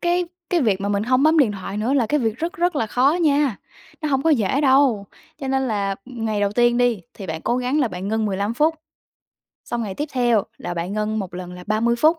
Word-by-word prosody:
cái 350 0 +1 0.3
cái 350 -2 +2
việc 200 -5 +1
mà 200 - -2
mình 205 0 0
hông 255 +4 +2
bấm 315 +1 +4
điện 245 -8 +4
thoại 195 0 -6
nữa 225 +6 0
là 250 -5 +2
cái 295 +3 +1
việc 225 -2 -1
rất 335 +2 -2
rất 350 -3 0
là 225 - 0
khó 255 +6 +3
nha, 285 -6 +2 0.4
nó 305 - 0
hông 270 -2 +1
có 325 - +3
dễ 260 0 +2
đâu. 260 -7 +4 0.3
Cho 270 -3 -5
nên 265 -1 0
là 200 -2 -1
ngày 225 -4 -3
đầu 200 0 +1
tiên 240 +1 +3
đi, 245 -4 +2
thì 195 - -8
bạn 160 -1 -4
cố 240 - 0
gắng 255 +4 0
là 255 - +2
bạn 185 +1 -5
ngưng 220 0 0
15 200 +3 -1
phút; 315 +4 +2 0.9
xong 235 -1 -3
ngày 200 -3 -4
tiếp 295 +7 -3
theo 240 -5 +2 0.2
là 175 - -5
bạn 170 +3 -3
ngưng 215 +1 -1
1 185 -3 -5
lần 180 0 -7
là 180 0 -10
30 230 +3 +1
phút; 315 +6 +3
235 Hz, 250 wpm, -22 LUFS, 205-280 Hz, 0.9 s, bấm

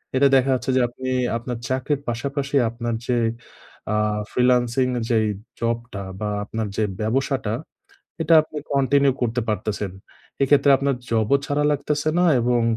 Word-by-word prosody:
এটা 140 +2 +5
দেখা 135 0 +3
যাচ্ছে 130 +1 -2
যে - - +4
আপনি 130 +2 -6 0.3
আপনার 120 +1 -5
চাকরির 130 +2 -1
পাশাপাশি 140 +4 -3
আপনার 115 0 -3
যে 125 - +1 0.8
আ - - +2 0.3
ফ্রিল্যান্সিং 125 0 +2 0.2
যেই 110 -2 +2 0.3
জবটা 115 -3 -3 0.2
বা 105 -1 -2 0.2
আপনার 110 +1 -3
যে 110 - +2 0.2
ব্যবসাটা, 120 0 0 0.7
এটা 165 +1 +4
আপনি 155 0 -8
কন্টিনিউ 140 0 +3
করতে 120 0 0
পারতেছেন। 105 -2 -2 0.5
এক্ষেত্রে 140 +1 +4
আপনার 140 0 +1 0.2
জবও 115 +3 +3
ছাড়া 145 +1 0
লাগতেছে 150 +1 -1
না 180 - +4 0.2
এবং 120 0 +2
125 Hz, 140 wpm, -23 LUFS, 115-140 Hz, 0.8 s, এটা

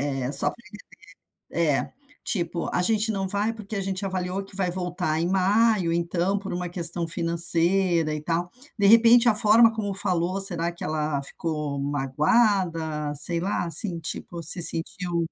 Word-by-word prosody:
Eh, 135 -1 -3
só 140 - 0
pra - - -15 0.2
entender 210 - -9 0.9
É, 140 - -1 0.3
tipo, 170 -3 -3
a 180 - +1
gente 220 +3 0
não 195 -2 -3
vai 205 +4 -1
porque 215 -1 -8
a 195 - -2
gente 195 +1 -4
avaliou 185 0 -3
que 195 - -14
vai 190 -2 -1
voltar 180 -3 -2
em 170 - 0
maio, 195 -1 +2
então, 170 +3 -1
por 200 -1 -6
uma 180 0 -4
questão 170 -1 -1
financeira 170 0 +2
e 150 - -5
tal. 170 +2 -2 0.3
De 200 - +1
repente, 230 +2 +6
a 215 - +2
forma 225 +2 +5
como 205 -3 -3
falou, 185 0 -1
será 175 -3 +3
que 170 - -10
ela 150 -2 -2
ficou 150 -1 -4
magoada, 150 - 0
sei 165 +4 +1
lá, 180 -1 -2
assim, 170 +1 0
tipo, 170 +2 -7
se 170 +3 0
sentiu 170 +1 +2
175 Hz, 170 wpm, -24 LUFS, 165-195 Hz, 0.9 s, repente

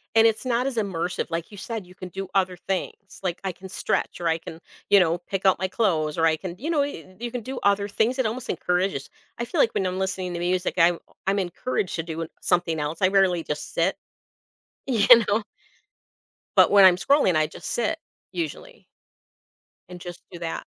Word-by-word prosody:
and 225 - +7
it's 225 +3 +2
not 245 +1 +1
as 270 - -3
immersive. 180 -4 -1
Like 165 +4 -4
you 205 - -11
said, 220 -2 -5
you 180 - -16
can 185 - -8
do 195 +1 -5
other 185 -2 +2
things, 195 +2 -5
like, 175 -2 -2
I 190 - -1
can 185 +2 -11
stretch, - - -2
or 170 - 0
I 165 0 +2
can 165 0 -10 0.3
you 200 - +7
know, 170 -1 +3
pick 195 +2 -5
out 190 -2 +5
my 190 - 0
clothes, 170 -7 0
or 165 - +3
I 160 -1 +3
can 180 -1 -6
you 300 +7 -4
know, 310 -4 +2
you 185 - -7
you 240 0 -3
can 245 - -4
do 260 +3 -5
other 200 0 +3
things. 225 +5 +1
It 260 - +1
almost 240 +4 -3
encourages 180 -6 -1 0.3
I 235 - -2
feel 235 - -3
like 230 - +4
when 190 - 0
I'm 185 +1 -2
listening 190 -1 -2
to 170 - -3
music, 180 +1 0
I'm 170 0 +5 0.3
I'm 200 +1 +2
encouraged 190 +2 -2
to 165 - -2
do, 165 0 -5
uh, - - -6
something 175 -3 +1
else, 150 +2 -3
I 185 - +6
rarely 190 -4 +3
just 150 0 -5
sit, 170 +3 +1 0.9
you 230 -6 +2 0.2
know. 210 +2 +1 1.1
But - - +6
when 200 -1 +8
I'm 180 -1 +7
scrolling, 275 - +3
I 155 0 +3
just - - -8
sit, 325 +7 0 0.3
usually. 360 +9 -6 1.0
And 180 0 -9
just 175 0 -9
do 175 - -9
that. 165 -1 -4
185 Hz, 215 wpm, -25 LUFS, 175-215 Hz, 1.1 s, when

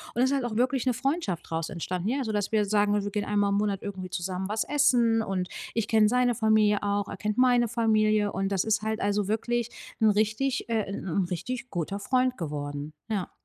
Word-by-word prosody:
und 240 - +1
ist 260 +2 +3
halt 270 -3 0
auch 225 -3 -3
wirklich 255 +2 +1
'ne 250 - +2
Freundschaft 270 - -2
draus 160 0 -2
entstanden, 180 +1 -3
ja? 270 +2 0
Sodass 210 -3 -2
wir 215 -1 +4
sagen, 205 0 +2
ne: 205 - +1
„Wir 205 - -4
gehen 210 0 -2
einmal 205 -1 +1
im 200 - +2
Monat 205 -2 0
irgendwie 190 -2 -6
zusammen 185 +1 -3
was 215 0 0
essen." 245 -6 +3
Und 190 -4 -2 0.2
ich 225 -2 -1
kenne 220 -2 +5
seine 245 +1 +2
Familie 215 -2 +3
auch, 205 0 -1
er - - -6
kennt 210 +1 -2
meine 245 -2 +4
Familie 215 -2 +2
und 195 +1 -1
das 195 -2 +1
ist 215 -1 +1
halt 220 0 -2
also 205 0 0
wirklich 235 +2 -1 0.3
'n 220 - +6
richtig 215 +6 0
äh, 225 -2 0
'n 200 - -5
'n 185 +2 0
richtig 250 +8 -4
guter 180 +3 -3
Freund 255 +3 +1
geworden, 145 -2 -5 0.2
ja. 200 -5 -2
210 Hz, 220 wpm, -27 LUFS, 195-240 Hz, 0.3 s, n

